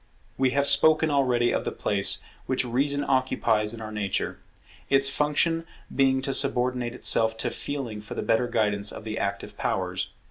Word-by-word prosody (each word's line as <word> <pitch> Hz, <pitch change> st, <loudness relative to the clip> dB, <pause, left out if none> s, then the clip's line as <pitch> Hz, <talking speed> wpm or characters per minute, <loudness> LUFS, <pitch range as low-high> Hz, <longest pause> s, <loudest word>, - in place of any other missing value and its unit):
We 130 Hz, 0 st, +2 dB
have 140 Hz, +2 st, +1 dB
spoken 155 Hz, +2 st, +6 dB
already 125 Hz, -4 st, +2 dB
of -, -, -1 dB
the -, -, -3 dB
place 100 Hz, 0 st, 0 dB, 0.2 s
which 130 Hz, -1 st, 0 dB
Reason 140 Hz, +4 st, 0 dB
occupies 125 Hz, -5 st, +1 dB
in 115 Hz, -1 st, -8 dB
our 110 Hz, -1 st, -7 dB
nature; 105 Hz, -3 st, -3 dB, 0.5 s
its 135 Hz, 0 st, +4 dB
function 165 Hz, +3 st, 0 dB, 0.3 s
being 130 Hz, -1 st, +2 dB
to 135 Hz, -1 st, -1 dB
subordinate 125 Hz, -2 st, +1 dB
itself 110 Hz, -2 st, +2 dB
to -, -, -2 dB
Feeling 125 Hz, -7 st, -5 dB
for 105 Hz, -, -9 dB
the -, -, -3 dB
better 115 Hz, +2 st, +1 dB
guidance 105 Hz, -3 st, 0 dB
of -, -, -9 dB
the 110 Hz, 0 st, -5 dB
Active 100 Hz, 0 st, -4 dB
powers. -, -, -2 dB
125 Hz, 170 wpm, -25 LUFS, 110-140 Hz, 0.5 s, spoken